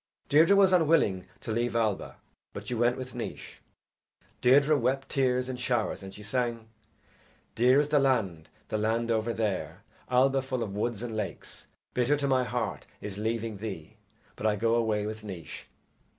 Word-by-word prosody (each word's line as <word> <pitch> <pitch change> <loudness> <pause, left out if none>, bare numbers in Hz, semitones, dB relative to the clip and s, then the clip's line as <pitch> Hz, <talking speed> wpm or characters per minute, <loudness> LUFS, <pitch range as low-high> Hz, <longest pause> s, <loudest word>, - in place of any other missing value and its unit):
Deirdre 160 +7 +6
was 195 -1 +5
unwilling 155 - +3
to - - -4
leave 120 +1 -1
Alba, 110 -4 0 0.4
but - - -7
she - - -3
went 120 +1 +2
with 130 -1 -7
Naois. 120 - -7 0.8
Deirdre 140 +4 +5
wept 135 +1 0
tears 125 -2 +1
in 130 -1 -4
showers 125 -4 -1
and 95 0 -8
she 105 - -11
sang: 115 0 -2 0.9
Dear 125 +4 +5
is 150 0 +1
the 150 -1 +4
land, 100 - 0 0.2
the 110 - -1
land 115 +2 0
over 110 +1 +1
there, 100 -5 -3 0.3
Alba 135 +2 +3
full 130 -2 -2
of 100 - -5
woods 110 +1 -2
and 115 -2 -4
lakes; 105 -2 -6 0.3
Bitter 125 +4 +2
to 140 -1 -1
my 130 -1 +3
heart 125 - -3
is 105 -1 -6
leaving 110 0 -2
thee, 95 -7 -7 0.4
But 110 - -1
I 105 - +2
go 115 +2 +1
away 110 -3 +1
with 110 0 -5
Naois. 90 -7 -8
115 Hz, 170 wpm, -29 LUFS, 105-130 Hz, 0.9 s, Deirdre